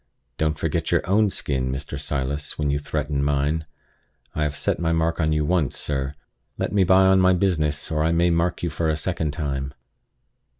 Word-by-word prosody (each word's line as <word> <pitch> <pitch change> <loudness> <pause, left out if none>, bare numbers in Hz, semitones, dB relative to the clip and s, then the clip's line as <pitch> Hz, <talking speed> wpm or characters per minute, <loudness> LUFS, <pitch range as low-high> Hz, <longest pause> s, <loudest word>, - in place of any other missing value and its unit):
"Don't 75 -1 +1
forget - - -1
your - - +1
own 105 +2 +3
skin, 65 -7 -2
Mr. 70 +1 -5
Silas, 70 0 -3
when 75 -2 0
you 70 - 0
threaten 75 -1 -2
mine! 75 +2 0 0.7
I 75 - -3
have 75 -1 0
set - - 0
my 80 -1 0
mark 80 +1 +1
on 80 0 +1
you 75 -1 +1
once, 80 -4 +1
sir. 70 0 -2 0.4
Let - - -2
me 100 -2 +4
by 95 +1 +5
on 95 0 +5
my 95 0 +5
business, 80 -6 0
or 75 -1 +1
I 80 - +2
may 85 +1 +3
mark 85 +2 0
you 85 - -1
for 80 +1 -1
a 75 - 0
second 80 -1 -2
time." 70 -3 -3
75 Hz, 200 wpm, -23 LUFS, 70-85 Hz, 0.7 s, by